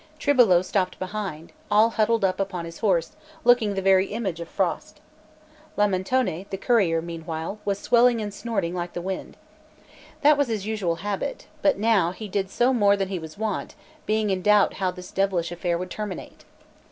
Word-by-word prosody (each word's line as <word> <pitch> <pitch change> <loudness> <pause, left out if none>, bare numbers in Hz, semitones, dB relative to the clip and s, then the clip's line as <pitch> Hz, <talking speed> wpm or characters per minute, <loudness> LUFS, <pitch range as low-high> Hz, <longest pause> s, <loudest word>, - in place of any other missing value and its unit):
Tribolo 240 -13 +4
stopped 185 -1 -1
behind, 185 -4 -5 0.2
all 220 +2 +4
huddled 225 -1 +2
up 185 0 0
upon 185 -3 -3
his 165 0 -9
horse, 175 -6 +1 0.3
looking 230 -5 +4
the 195 - -2
very 190 0 +4
image 200 -6 -3
of 170 - -7
frost. - - -2 0.8
Lamentone, 200 -1 0
the 195 - -4
courier, 185 -8 +2
meanwhile, 165 +3 -5
was 200 -1 0
swelling 235 +3 +3
and 205 -2 -4
snorting 200 -6 -2
like 175 -1 -4
the - - -4
wind. 190 +1 -5 0.9
That 295 0 +6
was 285 - +3
his 215 -4 -3
usual 210 -6 -1
habit; 205 - -3 0.2
but 290 - +3
now 200 -5 +2
he 215 +2 -7
did 195 -1 -2
so 245 +6 +2
more 205 -4 +4
than 195 -1 -2
he 190 -2 -3
was 160 +1 -10
wont, 215 -1 -3 0.3
being 215 -1 +1
in 185 -1 -1
doubt 210 +1 +4
how 185 - +2
this 180 0 -9
devilish 190 -3 0
affair 175 0 -1
would 180 +1 -6
terminate. 210 -4 -7
195 Hz, 175 wpm, -25 LUFS, 180-215 Hz, 0.9 s, That